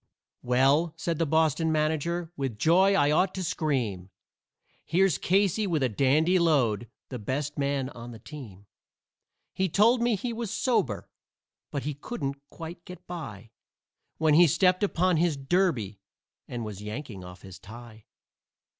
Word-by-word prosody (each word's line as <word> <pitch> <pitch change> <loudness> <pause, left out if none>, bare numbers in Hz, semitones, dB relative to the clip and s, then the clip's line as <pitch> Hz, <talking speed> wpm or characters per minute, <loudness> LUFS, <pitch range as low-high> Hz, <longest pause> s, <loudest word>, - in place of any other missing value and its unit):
"Well," 135 +7 +2
said 170 -2 -2
the 165 - +1
Boston 160 +1 +2
manager, 160 +2 -1
"with 135 -6 -3
joy 185 - +4
I 145 -2 +3
ought 185 +5 +2
to 190 - -3
scream 120 - -2 0.7
Here's 185 -4 +2
Casey 200 +2 +2
with 160 -6 0
a 130 - +2
dandy 150 - +3
load, 125 -9 +2 0.2
the 125 - -5
best 140 +7 -3
man 140 -2 0
on 120 -2 -10
the 115 - -9
team. 110 -8 -11 0.9
He 190 0 0
told 230 +8 +4
me 240 -2 +2
he 235 +5 -4
was 230 -2 -4
sober, 110 - 0 0.6
but 140 - -4
he 150 - -2
couldn't 140 - -5
quite 170 +1 -9
get 180 0 -11
by 115 - -8 0.7
When 155 -1 +3
he 170 +3 +7
stepped 180 +5 +3
upon 185 -3 +2
his 165 -2 +1
derby 135 - 0 0.5
and 120 -2 -5
was 105 -2 -7
yanking 105 -2 -7
off 90 0 -12
his 95 -2 -11
tie. 110 0 -12
150 Hz, 150 wpm, -27 LUFS, 120-175 Hz, 0.9 s, he